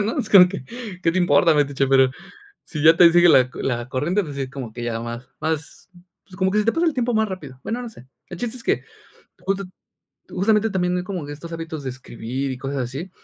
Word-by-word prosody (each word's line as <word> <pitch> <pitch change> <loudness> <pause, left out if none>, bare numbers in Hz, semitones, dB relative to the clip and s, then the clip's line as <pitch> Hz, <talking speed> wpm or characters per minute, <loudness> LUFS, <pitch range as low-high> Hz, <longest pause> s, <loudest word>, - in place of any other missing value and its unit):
¿no?, 215 +3 -2
es 215 - -3
como 180 -3 +9
que, 180 -8 -7 0.4
¿qué 165 - +3
te 185 - 0
importa, 165 -1 +4
metiche?, 140 -2 +1
pero 130 -1 +5 0.5
si 150 -4 -5
ya 160 +2 +7
te 170 -1 +7
sigue 175 0 +6
la 130 -5 +6
co - - -10
la 120 -2 -2
corriente, 170 +10 0
pues 145 - -7
sí, 135 -2 -4
como 130 -5 -7
que 120 - -7
ya 115 -1 -2
más 120 +2 -7
más, 160 +1 -4 0.4
pues, 185 - -16
como 190 -1 +1
que 210 - +1
se 210 - +2
te 230 - +2
pasa 335 +1 +1
el 320 - +1
tiempo 245 -1 0
más 220 0 +2
rápido, 145 -9 -8
bueno, 235 +2 -3
no 245 - -6
sé. 130 - -16 0.2
El 175 - -8
chiste 240 +4 -4
es 235 - -12
que - - +1 0.6
justo 195 0 -2 0.7
justamente 210 +3 +2
también 180 -2 0
hay 180 - -2
como 185 -6 -5
que 145 - -6
estos 165 +3 -9
hábitos 165 -3 -6
de 130 - -2
escribir 130 +1 -5
y 130 - -4
cosas 135 +1 -4
así, 140 +10 -6
165 Hz, 245 wpm, -22 LUFS, 135-190 Hz, 0.7 s, como